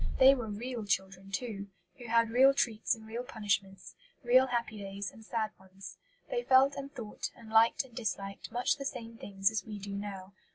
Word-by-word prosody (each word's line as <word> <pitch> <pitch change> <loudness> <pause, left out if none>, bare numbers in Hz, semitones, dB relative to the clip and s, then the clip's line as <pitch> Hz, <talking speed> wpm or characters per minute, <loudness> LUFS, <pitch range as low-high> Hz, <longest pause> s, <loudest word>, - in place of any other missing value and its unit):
They 265 +1 +8
were 245 -5 -3
real 230 +3 -4
children 190 -1 -2
too, 200 -1 -4 0.3
who 240 - -8
had 230 0 +3
real 265 +3 +6
treats 225 -5 +1
and 220 -1 -14
real 225 +2 -4
punishments, 200 -6 -2 0.3
real 255 +2 +6
happy 235 -3 -2
days 195 0 -5
and 225 - -15
sad 220 -1 -2
ones. 190 -1 -12 0.3
They - - 0
felt 270 - +5
and 275 0 -6
thought 230 -6 -5
and 225 -2 -13
liked 225 +3 +5
and 250 - -18
disliked 195 -4 -4
much 245 +4 +1
the 275 - -6
same 230 -4 -6
things 195 -1 +1
as 220 -4 -2
we 210 0 -7
do 200 0 -6
now. 200 -1 -6
220 Hz, 195 wpm, -32 LUFS, 200-245 Hz, 0.3 s, They